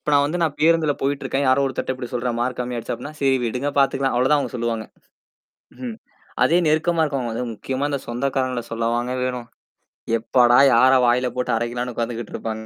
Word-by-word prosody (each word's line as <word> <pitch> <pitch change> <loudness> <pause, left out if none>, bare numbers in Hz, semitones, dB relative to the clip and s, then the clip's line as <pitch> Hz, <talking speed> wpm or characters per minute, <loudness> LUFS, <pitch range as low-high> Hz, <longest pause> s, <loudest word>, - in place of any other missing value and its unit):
இப்போ 150 - -3
நான் 140 0 +5
வந்து 170 +5 -2
நான் 155 -3 0
பேருந்துல 160 -2 +3
போயிட்டு 140 +1 -1
இருக்கேன். 140 +1 -1
யாரோ 130 +2 +4
ஒருத்தர் 130 0 -2
அப்படி 125 -1 -7
சொல்றாங்க. 120 -1 -2
மார்க் 125 0 -2
கம்மியா 125 0 -3
ஆயிடுச்சு 115 - -4
அப்படின்னா, 150 +1 -9
சரி 135 -1 +3
விடுங்க 125 +5 -2
பாத்துக்கலாம். 135 -1 +2
அவ்ளோ 130 +2 +2
தான் 150 - +5
அவங்க 140 - -4
சொல்லுவாங்க. 115 -2 -2 0.9
ம்ஹ்ம். 125 -3 -6 0.5
அதே 165 +8 +4
நெருக்கமா 160 +2 +2
இருக்கவங்க, 135 -6 -2
அது 120 - -3
முக்கியமா 130 +5 -3
அந்தச் 140 -2 -4
சொந்தக்காரங்கள 130 0 -1
சொல்ல 115 0 -2
வாங்க 120 +1 -1
வேணும். 125 -2 -3 0.7
எப்பாடா, 120 +1 +4 0.2
யார 130 +2 +6
வாயில 125 +1 +2
போட்டு 125 0 -1
அரைக்கலாம்னு 120 +2 -3
உக்காந்துகிட்டுருப்பா. 115 -1 -4
130 Hz, 185 wpm, -22 LUFS, 120-140 Hz, 0.9 s, யார